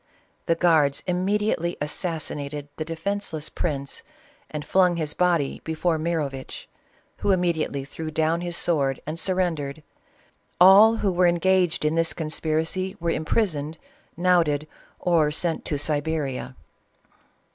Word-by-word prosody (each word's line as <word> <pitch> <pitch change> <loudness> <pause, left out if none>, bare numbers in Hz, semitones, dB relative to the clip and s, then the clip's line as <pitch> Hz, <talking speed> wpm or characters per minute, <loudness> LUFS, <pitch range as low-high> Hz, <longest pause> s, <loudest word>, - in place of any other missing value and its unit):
The 165 - +3
guards 160 -5 +3
imme 185 +3 +1
diately 175 -5 -1
assassinated 150 -2 -3
the 155 - -2
defenceless 165 -1 -3
prince 140 -4 -3 0.5
and 150 -1 -5
flung 180 -2 +3
his 155 -3 -1
body 170 -6 +1
before 160 +1 0
Mirovitch, 150 -5 -3 0.5
who - - -2
immediately 170 -7 0
thjew 155 +3 -6
down 160 +2 +1
his 175 -1 -4
sword 140 -6 +1
and 155 +2 -4
surrendered. 165 -6 -1 0.8
All 200 +5 +8
who 205 -3 0
were 180 0 +3
en 175 - +3
gaged 180 -2 +2
in 150 - +2
this 165 0 +1
conspiracy 160 +4 -2
were 170 0 0
imprisoned, 160 -3 -1 0.4
knouted, 165 -4 +2 0.3
or 165 -4 +2
sent 160 +2 -2
to 145 - -1
Siberia. 145 -3 -2
160 Hz, 125 wpm, -24 LUFS, 150-180 Hz, 0.8 s, All